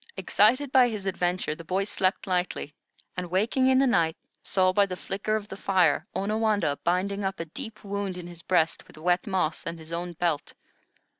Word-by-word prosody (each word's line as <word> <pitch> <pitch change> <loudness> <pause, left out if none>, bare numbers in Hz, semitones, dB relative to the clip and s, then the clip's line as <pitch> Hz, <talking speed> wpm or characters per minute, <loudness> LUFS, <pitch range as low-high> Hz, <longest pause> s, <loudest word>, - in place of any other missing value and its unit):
Excited 255 +7 +3
by 260 -2 +6
his 215 -4 -4
adventure, 180 -3 0
the 165 - -10
boy 185 +4 0
slept 195 -1 0
lightly, 180 -5 -1 0.4
and 180 -2 -4
waking 220 +8 +2
in 260 0 +5
the 270 - +5
night, 165 -10 +2 0.2
saw 185 -1 +2
by 200 +1 +4
the 185 - -4
flicker 200 +4 -2
of 210 -1 -3
the 190 - -7
fire 180 -5 +2
Onawandah 210 -6 +1
binding 195 +3 0
up 190 0 -2
a 165 - -3
deep 220 - -9
wound 200 -2 -3
in 180 - -7
his 175 -1 -9
breast 165 -3 +1
with - - -16
wet 175 +4 +1
moss 185 -5 0
and 170 - -5
his 160 0 -11
own 175 +1 -3
belt. 170 -3 -1
185 Hz, 195 wpm, -27 LUFS, 175-205 Hz, 0.4 s, by